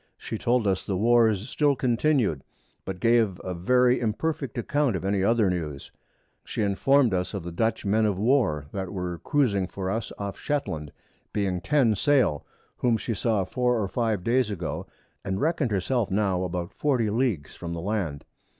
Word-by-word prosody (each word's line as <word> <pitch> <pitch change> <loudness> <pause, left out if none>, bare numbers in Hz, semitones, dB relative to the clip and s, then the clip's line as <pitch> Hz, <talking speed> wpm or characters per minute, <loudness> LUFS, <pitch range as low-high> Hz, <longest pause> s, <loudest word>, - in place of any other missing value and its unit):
She 110 - -6
told 120 -1 +1
us 95 -1 +1
the 95 - -2
Wars 110 -1 +3
still 145 0 +2
continued, 120 - +1 0.4
but 95 -1 -5
gave 115 -5 +2
a 95 - -3
very 125 +8 +3
imperfect 135 +5 -2
Account 140 0 +1
of 95 - -4
any 95 -1 +1
other 115 0 +3
News: 80 -6 -3 0.5
She - - -3
informed 120 +4 +3
us 90 +3 -1
of 95 - -4
the 85 - -6
Dutch 110 +6 -1
Men 110 +2 +3
of 100 -3 -1
War, 105 - +2
that 95 -2 -4
were 90 -3 -4
cruizing 100 - +1
for 95 -1 -3
us 115 +2 -3
off 100 -1 -5
Shetland 80 - -3 0.4
(being 95 -4 -1
10 130 - +3
Sail) 125 - +2 0.3
whom 120 -2 +2
she 115 - -3
saw 110 -1 0
4 125 +3 0
or 100 - -1
5 110 -1 -1
Days 120 +1 +2
ago, 90 -6 -4 0.4
and 95 -1 -2
reckon'd 155 -3 +1
her 100 -3 +1
self 120 +2 0
now 95 -2 +1
about 90 +1 -4
40 125 -8 +1
Leagues 110 - -1
from 85 -1 -6
the 85 - -4
Land. 90 -7 -2
105 Hz, 175 wpm, -26 LUFS, 95-125 Hz, 0.5 s, Wars